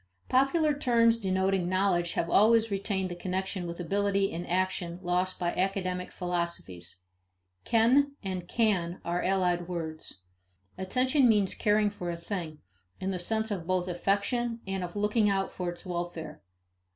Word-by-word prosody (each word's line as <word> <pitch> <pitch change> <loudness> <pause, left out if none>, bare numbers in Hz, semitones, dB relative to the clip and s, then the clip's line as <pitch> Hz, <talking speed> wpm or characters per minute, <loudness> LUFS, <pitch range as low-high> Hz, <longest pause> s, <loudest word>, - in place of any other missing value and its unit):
Popular 295 +4 +3
terms 230 -4 +3
denoting 190 -2 +1
knowledge 185 -2 +1
have 170 - 0
always 220 +4 +4
retained 195 -2 -1
the - - -4
connection 185 0 -3
with 170 +1 -6
ability 200 +2 +1
in 170 +2 -5
action 180 -1 -1
lost 180 +1 0
by 175 -1 -1
academic 185 -1 -1
philosophies. 170 - -3 0.6
Ken 260 +5 +4
and 185 -2 -4
can 185 -7 +1
are 175 +1 0
allied 180 -2 +1
words. 160 - -5 0.5
Attention 255 +7 +2
means 205 -3 +3
caring 210 0 +2
for 180 -4 -5
a 170 - -3
thing, 170 -3 -5 0.4
in 190 - -2
the 185 - -3
sense 220 +4 0
of 175 -5 -3
both 185 -1 0
affection 205 +6 0
and 195 -1 -3
of 175 +1 -6
looking 210 +1 +2
out 195 -1 0
for 180 -1 -3
its 175 +2 -8
welfare. 175 - -5
185 Hz, 150 wpm, -29 LUFS, 175-210 Hz, 0.6 s, always